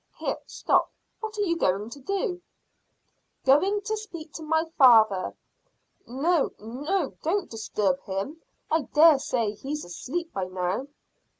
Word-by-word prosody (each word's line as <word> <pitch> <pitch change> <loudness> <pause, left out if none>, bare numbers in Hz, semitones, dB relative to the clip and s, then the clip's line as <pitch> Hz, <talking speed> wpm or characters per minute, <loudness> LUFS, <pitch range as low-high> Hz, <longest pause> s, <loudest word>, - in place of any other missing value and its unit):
Here: - - -2
stop! - - +1 0.3
What 440 -1 -6
are - - 0
you 335 -4 +1
going 205 - 0
to 285 - -9
do?" 375 - -2 1.0
"Going 375 +10 +4
to 435 +1 -2
speak 340 -8 -9
to 320 +1 -1
father." 220 -8 +5 0.7
"No, 290 +6 +1
no, 285 - -2
don't 355 +3 -1
disturb 205 -4 -1
him. 200 +12 -4 0.3
I 315 -3 +1
dare 305 -2 +8
say 230 -6 0
he's 275 +8 -5
asleep 325 - -5
by 190 -2 -2
now." 185 +7 -2
295 Hz, 130 wpm, -26 LUFS, 215-340 Hz, 1.0 s, dare